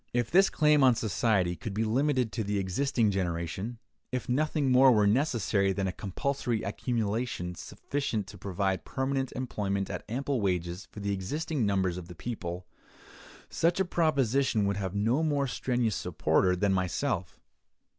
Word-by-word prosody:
If 120 -1 0
this 190 +2 +6
claim 150 -2 +4
on 125 -2 +6
society 100 -4 +1
could 95 +5 -6
be 110 - +1
limited 125 +1 +1
to 110 +3 -2
the 105 0 -1
existing 110 +4 +1
generation; 95 +4 -3 0.3
if 125 0 -3
nothing 145 +1 +1
more 130 +1 +7
were 105 -3 +4
necessary 105 -5 +2
than 100 0 -1
a 95 - 0
compulsory 120 - -2
accumulation, 110 -3 -2
sufficient 115 - -3
to 100 +1 -11
provide 95 0 -1
permanent 135 -1 -2
employment 100 -6 -2
at - - -5
ample 135 +1 -1
wages 90 -1 -2
for 105 - -9
the 100 0 -1
existing 140 - -2
numbers 95 -3 +1
of 90 -2 -7
the 90 - -10
people; 90 -4 -5 0.8
such 170 +3 +1
a 190 - +3
proposition 135 - +1
would 100 0 0
have 95 -1 -3
no 115 +8 +2
more 145 -3 +1
strenuous 125 -5 -1
supporter 90 -1 +1
than 95 +2 +1
myself. 95 +2 -1
110 Hz, 155 wpm, -29 LUFS, 95-135 Hz, 0.8 s, more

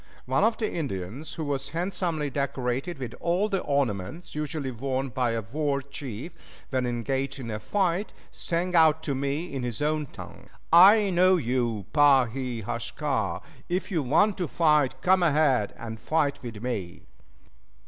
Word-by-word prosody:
One 130 +8 +1
of 225 +1 +3
the 220 - 0
Indians, 135 - -4
who 160 - -4
was 140 -1 -2
handsomely 170 -3 -2
decorated 140 +3 -2
with 125 -4 -6
all 180 +5 +1
the 195 -2 0
ornaments 140 - -2
usually 150 -2 -3
worn 130 +2 -2
by 125 -2 0
a 115 -1 -2
war 140 +5 -1
chief 140 0 -7 0.4
when 130 -2 0
engaged 130 +3 -2
in 120 -4 -6
a 105 - -3
fight, 190 - 0 0.2
sang 175 +2 -2
out 160 -2 +5
to 145 - -1
me, 140 +5 -2
in 135 - -3
his 120 -3 -4
own 150 0 0
tongue, - - -11 0.2
"I 200 +4 +8
know 185 +1 +5
you, 120 - -1
Pa 145 -4 +6
he 120 -1 -4
haska; 115 - -2 0.3
if 185 +3 -2
you 165 -4 +1
want 195 - +2
to 175 - 0
fight, 150 -4 +2
come 185 0 +4
ahead 145 - +3
and 110 -1 -7
fight 145 +1 0 0.2
me." 100 -9 -4
140 Hz, 160 wpm, -27 LUFS, 125-165 Hz, 0.4 s, I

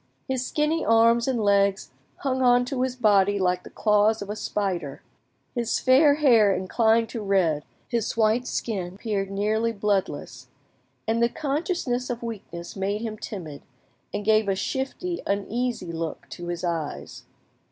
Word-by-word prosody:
His 260 -2 -1
skinny 300 +4 0
arms 230 +1 +4
and 260 -3 0
legs 200 -1 +2 0.3
hung 260 -1 0
on 245 -1 +4
to 250 0 -3
his 255 -1 -1
body 205 -4 +3
like 180 -1 +1
the - - -12
claws 210 0 +2
of 200 - -6
a - - -3
spider, 180 -10 -3 0.5
his 235 -3 0
fair 285 +3 +5
hair 235 -9 +5
inclined 225 +4 +2
to 230 - -5
red, 180 -7 +1 0.2
his 230 -2 -2
white 225 +3 +2
skin 190 -5 -3
appeared 200 -2 -2
nearly 215 +3 0
bloodless, 205 -3 -2 0.6
and 225 +1 +1
the 235 - +4
consciousness 280 -3 -2
of 240 -1 -4
weakness 180 -7 -7
made 200 +2 -2
him 225 -2 -4
timid, 175 -9 -7 0.5
and 205 0 -4
gave 215 -1 +3
a 195 - +2
shifty, 275 - -3
uneasy 205 -1 -2
look 165 -1 -5
to 175 - -8
his 175 0 -4
eyes. 160 - -4
215 Hz, 150 wpm, -25 LUFS, 195-245 Hz, 0.6 s, fair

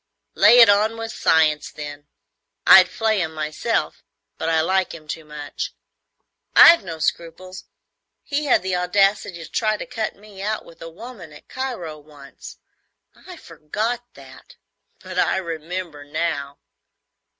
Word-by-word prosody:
"Lay 240 - +6
it 235 -2 +9
on 210 +2 +3
with 225 0 -5
science, 155 -2 +2
then. 145 -1 -9 0.6
I'd - - +8
flay 220 -3 0
him 160 -2 -4
myself, 155 0 -2 0.4
but 160 - -2
I 160 -1 +2
like 185 +2 0
him 155 -2 -14
too 160 +1 -6
much." 150 -1 -7 0.8
"I've 335 - +8
no 165 -4 -7
scruples. 170 +3 -4 0.6
He 295 +1 -2
had 255 -9 +3
the 190 -1 -1
audacity 185 -1 +1
to - - -16
try 215 -1 0
to - - -6
cut 225 -4 -4
me 205 -1 -13
out 215 +2 -3
with 165 - -17
a 165 - -7
woman 195 -2 -11
at 150 - -16
Cairo 225 -13 -5
once. 145 -2 -14 0.6
I 360 - -13
forgot 215 - -4
that, - - -15 0.4
but - - -6
I - - +2
remember 170 -2 -6
now." 145 -2 -3
180 Hz, 145 wpm, -21 LUFS, 155-215 Hz, 0.8 s, it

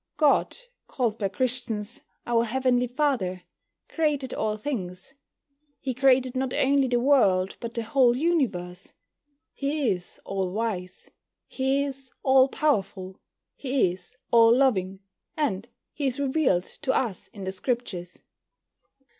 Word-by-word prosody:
God, 300 -3 +3 0.3
called 230 -4 -1
by 200 - +1
Christians 240 0 -3 0.2
"Our 235 -1 +2
Heavenly 250 +1 +1
Father," 240 -9 -1 0.4
created 290 -5 -1
all 215 -1 -1
things. 205 -4 -5 0.7
He 260 - -3
created 260 0 +3
not 260 0 -1
only 275 0 +3
the 245 -1 +1
world, 200 -9 +3
but 235 -1 -6
the 230 - -2
whole 245 +1 +3
universe. 220 - -1 0.6
He 280 -4 0
is 180 -2 -6
all 195 -2 -2
wise, 190 -4 -4 0.4
He 270 +1 0
is 270 -2 -6
all 265 0 +6
powerful, 195 - -1 0.4
He 260 -9 +1
is 185 +7 -13
all 230 0 +6
loving, 195 -8 +1 0.4
and 235 -7 -1 0.2
He 280 -2 -1
is 260 +1 -2
revealed 270 - +2 0.2
to 275 -4 +1
us 225 -8 -2
in 200 - -10
the 190 - -3
Scriptures. 190 -5 -4
245 Hz, 130 wpm, -26 LUFS, 195-270 Hz, 0.7 s, all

